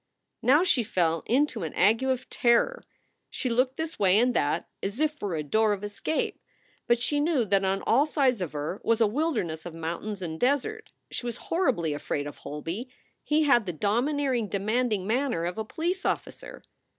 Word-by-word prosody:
Now 290 +7 +5
she 315 -9 +3
fell 165 -6 0
into 255 -3 +1
an 160 -3 -5
ague 210 +6 +4
of 260 -1 -1
terror. 245 - +2 0.5
She 255 - -3
looked 255 +3 +1
this 320 0 -4
way 190 -1 +4
and 245 +2 +3
that, 150 -4 0
as 200 +6 -4
if 310 0 +2
for 205 - -4
a 155 - -2
door 215 +8 +2
of 200 0 -5
escape. 205 +9 -2 0.5
But 240 0 +3
she 290 +4 +1
knew 295 -5 +2
that 195 -1 +2
on 195 +1 0
all 275 +7 +3
sides 265 -7 +1
of 170 -5 -3
her 150 +7 -4
was 230 0 +2
a 225 - +5
wilderness 215 - -1
of 170 -2 -8
mountains 170 +5 -4
and 160 -2 -5
desert. 290 - 0 0.2
She 240 - -4
was 235 - -4
horribly 255 - 0
afraid 145 0 -3
of 145 - -7
Holby; 165 - -5 0.3
he 305 +1 +2
had 240 -8 +4
the 180 - -2
domineering, 245 - 0
demanding 210 0 0
manner 235 -6 0
of 180 +5 -3
a - - -1
police 345 - -3
officer. - - -4
225 Hz, 185 wpm, -27 LUFS, 185-270 Hz, 0.5 s, Now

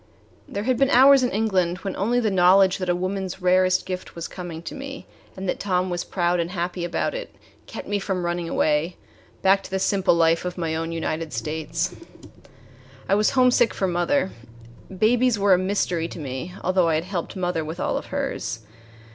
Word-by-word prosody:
There 200 - -4
had 255 +1 +1
been 275 -1 +3
hours 270 +1 +7
in 250 - +1
England 190 -5 0
when 195 - -3
only 235 +5 +1
the 220 -4 0
knowledge 190 +1 +5
that 185 -1 -3
a 175 - +3
woman's 185 +1 -3
rarest 185 0 +3
gift 185 -1 -6
was 170 -1 -5
coming 170 -3 -7
to - - -6
me, 275 0 -8 0.3
and 190 0 -5
that - - -1
Tom 185 -2 0
was 175 0 -2
proud 175 -1 0
and 170 0 -1
happy 175 -1 -3
about 175 - -1
it, - - -7 0.3
kept - - -8
me 205 0 0
from 190 -2 -2
running 175 -1 -2
away 155 +3 +1 0.5
back 195 +1 +5
to - - -10
the 190 - -1
simple 190 -1 +2
life 165 0 +3
of 180 0 -4
my 165 -2 -2
own 165 +1 -3
United 160 -1 -3
States. 155 - -3 1.1
I - - +2
was 210 +1 +3
homesick 250 -2 +3
for 195 - 0
mother. 180 +7 +1 0.6
Babies 230 +5 +2
were 200 -1 +4
a 180 - +4
mystery 185 -3 0
to - - -9
me, 145 +4 -6
although 185 -1 +2
I 160 - +2
had 155 - 0
helped 180 -2 -5
mother 180 -3 -1
with 160 +3 -6
all - - -1
of - - -4
hers. 115 - -3
185 Hz, 195 wpm, -23 LUFS, 170-200 Hz, 1.1 s, hours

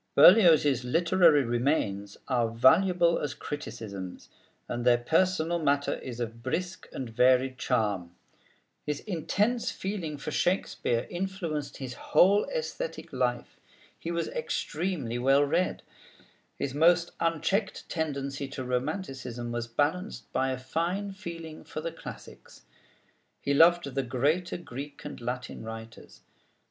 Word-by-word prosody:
Berlioz's 160 - +7
literary 165 +2 +4
remains 115 -5 -1
are 120 -4 +1
valuable 170 +9 +4
as 145 -2 -3
criticisms, 100 -10 -7 0.4
and 120 0 -3
their 120 -1 +5
personal 165 +5 +1
matter 145 -2 +1
is 125 -2 -7
of 115 -1 -4
brisk 180 +9 -3
and 130 - -5
varied 130 +3 +3
charm. 100 -8 -1 0.7
His 150 -1 -3
intense 210 +6 0
feeling 185 -7 -4
for 145 +2 -5
Shakespeare 150 -9 0
influenced 175 -6 -3
his 130 -2 -6
whole 195 - +4
æsthetic - - -4
life. 125 -1 -2 0.4
He 165 - -5
was 170 0 -1
extremely 165 - -2
well 135 +3 +4
read. 165 +6 0 0.7
His 135 - -3
most 170 +3 +4
unchecked 165 +5 0
tendency 140 -4 -3
to 135 -1 -6
romanticism 125 -3 -3
was 120 0 -3
balanced 150 - -2
by 135 - +1
a 130 - -2
fine 170 +10 -2
feeling 170 -5 -8
for - - -6
the 165 +2 -3
classics. 165 - -11 0.8
He 140 - 0
loved 170 +4 +6
the 135 - +1
greater 145 +9 0
Greek 145 -3 -8
and 145 - -7
Latin 125 +1 -4
writers. 115 0 -9
145 Hz, 125 wpm, -28 LUFS, 125-175 Hz, 0.8 s, Berlioz's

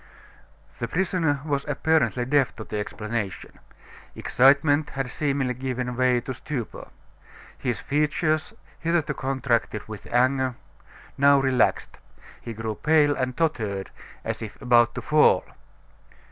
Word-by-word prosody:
The 120 - -2
prisoner 165 -2 0
was 140 -2 -1
apparently 145 -3 +1
deaf 140 0 +2
to 110 - -7
the 105 - -4
explanation. 105 -1 -5 0.6
Excitement 145 +3 +3
had 135 -2 -4
seemingly 140 -3 -1
given 125 -1 -3
way 125 -1 +2
to 130 - -5
stupor. 125 -2 -6 0.7
His 125 -4 -3
features, 150 +3 0 0.3
hitherto 165 -2 0
contracted 130 -5 -1
with 110 -1 -9
anger, 130 +1 +2 0.6
now 140 0 +6
relaxed. 130 -3 +1 0.4
He 115 - -6
grew 110 0 -3
pale 150 +3 +3
and 130 -1 -2
tottered, 110 -12 -1 0.3
as - - -3
if 110 -2 -8
about 120 -2 +4
to - - -5
fall. 150 0 +4
130 Hz, 120 wpm, -25 LUFS, 120-145 Hz, 0.7 s, now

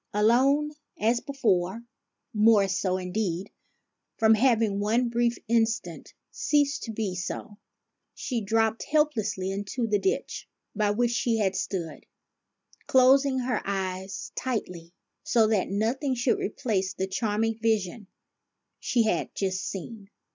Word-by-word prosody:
Alone 265 +8 +3 0.3
as 230 +3 +2
before, 225 -6 0 0.5
more 210 -2 +5
so, 185 0 0
indeed, 185 0 -3 0.7
from 220 0 +5
having 220 -3 +2
one 230 +4 +1
brief 240 0 +1
instant 225 +1 -1 0.2
ceased 290 -2 +1
to 225 - -5
be 210 -3 -2
so, 205 +4 -6 0.6
she 240 -4 -3
dropped 225 +2 +1
helplessly 225 -11 0
into 205 +5 -3
the 210 -2 +1
ditch 385 - -2 0.3
by 210 -1 +1
which 235 +3 +1
she 235 -1 +1
had 195 -3 0
stood, 185 -4 -4 0.8
closing 265 +1 +5
her 250 -2 -1
eyes 190 -1 -4
tightly, 180 -9 -4 0.3
so 230 -3 +3
that 215 -3 +1
nothing 240 +7 0
should 245 0 +1
replace 195 -4 -2
the 190 - -1
charming 220 +3 -1
vision 215 -2 0 0.7
she 240 -2 +1
had 220 - 0
just 190 -1 -1
seen. 200 +2 -7
220 Hz, 125 wpm, -27 LUFS, 195-240 Hz, 0.8 s, more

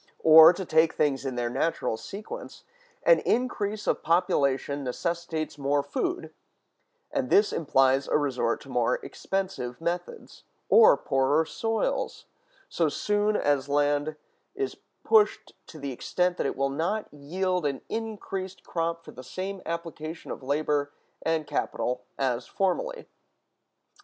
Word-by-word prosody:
Or, 160 +1 +10
to 185 +1 -5
take 160 0 +3
things 140 -2 +1
in 130 - -3
their 120 -1 -1
natural 135 -2 0
sequence, 215 - -8 0.4
an - - +6
increase 215 -4 -1
of - - 0
population 145 -5 +1
necessitates 160 +3 -3
more 140 +1 +1
food; 360 - -3 0.8
and 275 -3 -1
this 205 +1 +4
implies 135 -3 +2
a - - +3
resort 130 -5 0
to 135 - -13
more 125 -1 +1
expensive 185 -11 -3
methods, 175 - -5 0.3
or 460 +2 +7
poorer 140 +4 +2
soils, 225 +6 -2 0.4
so - - +1
soon 210 0 0
as 145 -5 +1
land 145 +1 +1 0.4
is 405 0 -2 0.3
pushed 435 -2 +3
to 160 - -11
the 140 -2 -5
extent 180 +7 -1
that - - 0
it - - -4
will 135 0 0
not 180 +9 -2
yield 180 +5 -2
an 140 -2 -3
increased 195 -4 -5
crop 165 0 -3
for - - -10
the 130 - -11
same 190 +8 -5
application 165 -1 -5
of - - -6
labor 145 +1 0 0.3
and 160 -1 0
capital 125 -3 -2
as 125 -3 -1
formerly. 465 - -1
160 Hz, 135 wpm, -27 LUFS, 140-195 Hz, 0.8 s, Or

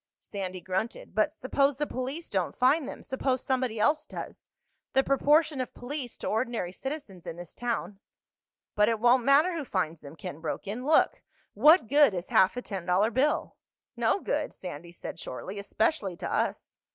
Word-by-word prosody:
Sandy 185 -3 -6
grunted. 190 +6 -3
"But 215 +8 +2
suppose 275 -1 +1
the 295 - 0
police 270 +6 -4
don't 190 -3 -1
find 270 +3 +3
them? - - -8
Suppose 260 -1 -1
somebody 255 -4 -1
else 295 +7 +2
does? - - -8 0.5
The 265 - +4
proportion 295 +1 +3
of 255 - -6
police 250 -1 -5
to - - -5
ordinary 225 -5 -1
citizens 265 - -7
in - - -5
this 175 -1 -9
town—" 230 -4 -3 0.7
"But 210 +1 +4
it 225 -1 0
won't 245 +2 +5
matter 295 +6 +5
who 320 - -3
finds 170 - -2
them," 140 +1 -11
Ken 165 -3 -7
broke 165 +5 -4
in. 215 +5 -4
"Look: 310 +3 +3 0.3
what 315 -2 +6
good 285 -5 +5
is 175 0 -5
half 190 +5 +4
a 250 - -3
ten 190 -4 -6
dollar 195 +5 +3
bill?" 275 +5 +1 0.4
"No - - +2
good," - - -2
Sandy 170 -2 -8
said 175 - -8
shortly. 190 +10 -6
"Especially 200 - 0
to - - -4
us." - - -2
240 Hz, 175 wpm, -28 LUFS, 190-275 Hz, 0.7 s, what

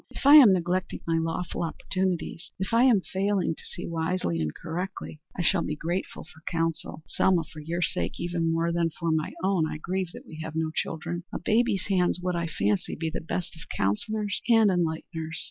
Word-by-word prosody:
If - - -9
I 285 - +9
am 250 -9 +10
neglecting 180 0 0
my 165 -1 +1
lawful 165 +2 -2
opportunities, 175 0 -2
if 190 +3 -3
I 235 +2 +6
am 230 -7 +5
failing 195 -1 0
to - - -12
see 175 - -6
wisely 160 - -1
and 75 -1 -1
correctly, 175 - -5 0.2
I 175 - 0
shall 175 +1 +3
be 150 - -2
grateful 170 +5 -3
for 160 +1 -17
counsel. 165 -2 -2
Ah, - - -32
Selma, 180 -3 +3
for 155 - -12
your 170 +3 -2
sake, - - -2
even 170 -1 0
more 165 +1 +1
than 170 -1 +1
for 165 0 -2
my 160 -1 0
own, 190 -4 +2
I 155 - -4
grieve 185 +3 -2
that - - -10
we 155 - -10
have 160 0 -6
no 160 -1 0
children. 170 +2 -3
A - - -2
baby's 220 -3 +2
hands 180 -3 +2
would, 180 0 -1
I 170 -1 -1
fancy, 105 -10 0
be 160 0 -2
the - - -3
best 170 +2 -4
of 160 - -13
counsellors 205 - -1
and 225 -3 +6
enlighteners." 160 -2 -2
170 Hz, 205 wpm, -27 LUFS, 160-185 Hz, 0.2 s, am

